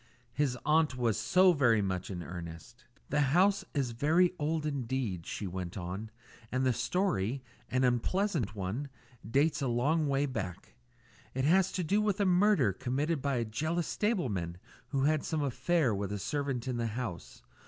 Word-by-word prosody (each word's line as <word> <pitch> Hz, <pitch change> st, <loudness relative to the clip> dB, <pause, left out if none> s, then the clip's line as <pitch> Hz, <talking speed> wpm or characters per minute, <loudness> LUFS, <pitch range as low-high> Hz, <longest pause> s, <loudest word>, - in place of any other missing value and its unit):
His 135 Hz, -2 st, 0 dB
aunt 150 Hz, -3 st, +3 dB
was 115 Hz, -4 st, +1 dB
so 185 Hz, 0 st, +4 dB
very 120 Hz, -8 st, +4 dB
much 95 Hz, -2 st, -2 dB
in 90 Hz, -3 st, -5 dB
earnest. 85 Hz, +7 st, -9 dB, 0.2 s
"The 145 Hz, -, +1 dB
house 185 Hz, +9 st, +3 dB
is 135 Hz, -4 st, 0 dB
very 160 Hz, +9 st, +3 dB
old 155 Hz, +1 st, -1 dB
indeed," 125 Hz, -, -2 dB
she 105 Hz, -, -4 dB
went 90 Hz, 0 st, -5 dB
on, 95 Hz, +4 st, -5 dB, 0.4 s
"and 130 Hz, +1 st, +1 dB
the 130 Hz, -, +3 dB
story 135 Hz, -, 0 dB, 0.3 s
an 130 Hz, +3 st, +1 dB
unpleasant 125 Hz, -, +1 dB
one 105 Hz, +9 st, -3 dB, 0.3 s
dates 140 Hz, +8 st, +1 dB
a 135 Hz, -, 0 dB
long 145 Hz, +7 st, +1 dB
way 140 Hz, 0 st, +2 dB
back. 100 Hz, -9 st, -5 dB, 0.6 s
It 130 Hz, 0 st, 0 dB
has 185 Hz, +4 st, +4 dB
to 185 Hz, -, -1 dB
do 200 Hz, +6 st, +2 dB
with 210 Hz, -1 st, 0 dB
a 200 Hz, -, +3 dB
murder 180 Hz, -, +4 dB
committed 140 Hz, -, -1 dB
by 140 Hz, -1 st, 0 dB
a 120 Hz, -1 st, 0 dB
jealous 155 Hz, +10 st, -1 dB
stableman 115 Hz, -, -1 dB, 0.3 s
who 135 Hz, -2 st, 0 dB
had 155 Hz, +1 st, +2 dB
some 155 Hz, -2 st, -1 dB
affair 140 Hz, 0 st, +1 dB
with 100 Hz, 0 st, -3 dB
a 105 Hz, -, -2 dB
servant 135 Hz, +2 st, -2 dB
in 125 Hz, -2 st, -1 dB
the 115 Hz, -1 st, -1 dB
house. 115 Hz, -5 st, -6 dB
130 Hz, 170 wpm, -31 LUFS, 110-155 Hz, 0.6 s, so